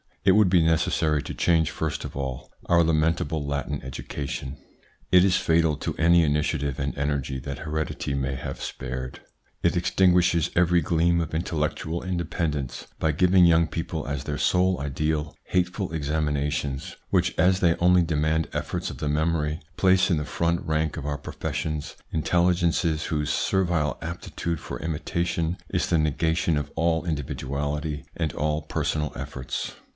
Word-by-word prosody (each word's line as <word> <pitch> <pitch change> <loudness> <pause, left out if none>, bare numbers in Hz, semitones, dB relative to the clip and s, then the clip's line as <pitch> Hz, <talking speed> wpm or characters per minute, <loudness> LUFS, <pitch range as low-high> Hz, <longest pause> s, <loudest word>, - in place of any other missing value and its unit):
It 95 - +6
would 105 -2 +5
be 90 -2 +4
necessary 80 -2 +2
to - - -6
change 80 -2 +2
first 80 -2 -3
of - - -8
all 65 -2 -5
our 85 -1 +4
lamentable 80 -1 +1
Latin 70 0 -3
education. 65 +1 -5 0.5
It 90 0 +7
is 95 -1 +4
fatal 80 -2 +2
to - - -3
any 85 +1 +5
initiative 75 -2 0
and 70 +1 -2
energy 70 -2 -1
that 70 +2 -6
heredity 80 -2 -3
may 65 0 -1
have 60 - -6
spared. 65 0 -5 0.4
It - - +3
extin 95 -2 +3
guishes 90 -3 +3
every 90 0 +4
gleam 85 +2 +2
of 80 -1 -4
intellectual 80 0 -2
independence 85 -6 -2
by 80 -1 +1
giving 90 +3 +5
young 85 -1 +5
people 80 0 -4
as 70 -1 -3
their 75 -1 -3
sole 90 +5 +2
ideal 75 +2 -2
hateful 90 +1 -1
examinations, 75 -3 -1
which, - - +2
as 90 +1 +4
they 85 -3 +3
only 90 0 +5
demand 80 0 +1
efforts - - -3
of - - -10
the 75 - -1
memory, 75 0 0 0.2
place 95 0 +4
in 85 - +3
the 75 - -2
front 85 +2 0
rank 80 -1 0
of - - -5
our 75 -1 -2
professions 75 +2 -4 0.2
intelligences 85 -1 +1
whose 75 -3 -1
servile 85 -4 +1
aptitude 85 -1 -4
for - - -6
imitation 85 +2 -1
is - - 0
the 85 - +2
negation 80 +1 +1
of 75 - -3
all 80 0 +1
individuality 75 0 -3
and 80 -2 -2
all 75 +1 0
personal 75 -1 -1
efforts. 65 0 -5
80 Hz, 155 wpm, -25 LUFS, 75-85 Hz, 0.5 s, It